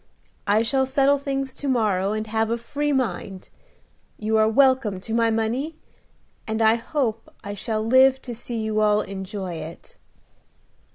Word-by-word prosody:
I 210 Hz, +2 st, +3 dB
shall 265 Hz, +3 st, +1 dB
settle 275 Hz, +1 st, +3 dB
things 275 Hz, -1 st, -3 dB
to 285 Hz, -, -6 dB
morrow, 205 Hz, -7 st, +1 dB
and 215 Hz, 0 st, -2 dB
have 220 Hz, 0 st, 0 dB
a 230 Hz, -, 0 dB
free 290 Hz, +5 st, -2 dB
mind. 225 Hz, -8 st, -3 dB, 0.7 s
You 220 Hz, +1 st, -1 dB
are 220 Hz, 0 st, +4 dB
welcome 260 Hz, -5 st, +3 dB
to 220 Hz, +4 st, -6 dB
my 230 Hz, 0 st, +3 dB
money, 235 Hz, +8 st, -1 dB, 0.7 s
and 220 Hz, 0 st, -2 dB
I 220 Hz, 0 st, +5 dB
hope 230 Hz, -2 st, -2 dB
I 205 Hz, 0 st, -5 dB
shall 215 Hz, +1 st, -3 dB
live 260 Hz, +2 st, +5 dB
to 245 Hz, -, -6 dB
see 235 Hz, 0 st, -6 dB
you 215 Hz, 0 st, -1 dB
all 210 Hz, 0 st, +3 dB
enjoy 190 Hz, -1 st, -5 dB
it." 160 Hz, +1 st, -10 dB
225 Hz, 160 wpm, -23 LUFS, 215-265 Hz, 0.7 s, I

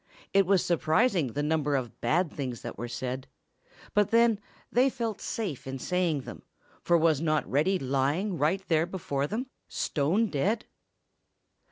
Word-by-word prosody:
It 195 Hz, -2 st, +4 dB
was 195 Hz, -2 st, +3 dB
surprising 170 Hz, -, +2 dB
the 145 Hz, -, -1 dB
number 150 Hz, -1 st, +1 dB
of 125 Hz, -3 st, -4 dB
bad 170 Hz, +1 st, +2 dB
things 130 Hz, -5 st, -4 dB
that -, -, -5 dB
were 120 Hz, +4 st, -5 dB
said. 130 Hz, +2 st, -4 dB, 0.7 s
But 210 Hz, -1 st, +3 dB
then, 230 Hz, -2 st, +4 dB, 0.3 s
they 255 Hz, +3 st, +4 dB
felt 230 Hz, -4 st, -3 dB
safe 185 Hz, -, -4 dB
in 135 Hz, 0 st, -4 dB
saying 170 Hz, 0 st, 0 dB
them, -, -, -9 dB, 0.4 s
for 175 Hz, -, +3 dB
was 160 Hz, -3 st, +3 dB
not 155 Hz, -2 st, +1 dB
Reddy 160 Hz, +8 st, +2 dB
lying 140 Hz, +8 st, 0 dB
right 185 Hz, +6 st, +1 dB
there 160 Hz, 0 st, +2 dB
before 145 Hz, -6 st, -2 dB
them, 225 Hz, -, -2 dB, 0.2 s
stone 165 Hz, +10 st, +1 dB
dead? 205 Hz, +5 st, 0 dB
160 Hz, 155 wpm, -28 LUFS, 140-195 Hz, 0.7 s, It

